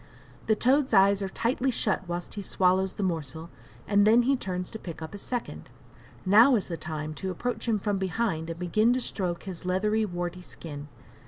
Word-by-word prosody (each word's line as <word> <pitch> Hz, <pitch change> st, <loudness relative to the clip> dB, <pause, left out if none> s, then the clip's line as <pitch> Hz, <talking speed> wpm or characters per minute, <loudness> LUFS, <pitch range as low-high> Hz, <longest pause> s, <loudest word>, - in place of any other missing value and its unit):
The 220 Hz, -, +4 dB
toad's 260 Hz, +2 st, +2 dB
eyes 195 Hz, +1 st, +5 dB
are 195 Hz, -, -2 dB
tightly 250 Hz, +6 st, 0 dB
shut 210 Hz, -6 st, 0 dB
whilst 175 Hz, 0 st, -4 dB
he 205 Hz, -, -5 dB
swallows 190 Hz, 0 st, +2 dB
the 205 Hz, -, -3 dB
morsel, 160 Hz, -2 st, -3 dB, 0.4 s
and 205 Hz, 0 st, +4 dB
then 235 Hz, +3 st, +6 dB
he 275 Hz, +3 st, +3 dB
turns 180 Hz, -7 st, -4 dB
to 220 Hz, -, -7 dB
pick 170 Hz, -6 st, -8 dB
up 160 Hz, +2 st, -7 dB
a 205 Hz, -, -7 dB
second. 245 Hz, +3 st, -5 dB, 0.6 s
Now 225 Hz, +8 st, +7 dB
is 205 Hz, -, -2 dB
the 170 Hz, -, -2 dB
time 155 Hz, -1 st, -5 dB
to 190 Hz, +4 st, -5 dB
approach 240 Hz, +8 st, -3 dB
him 225 Hz, -2 st, +2 dB
from 205 Hz, -1 st, -1 dB
behind 190 Hz, -4 st, -1 dB
and 165 Hz, -, -5 dB
begin 215 Hz, +7 st, +2 dB
to 255 Hz, -, 0 dB
stroke 180 Hz, -8 st, -3 dB
his 185 Hz, -3 st, -6 dB
leathery, 210 Hz, +4 st, +1 dB
warty 175 Hz, -1 st, -4 dB
skin. 145 Hz, -4 st, -9 dB
190 Hz, 195 wpm, -27 LUFS, 175-220 Hz, 0.6 s, Now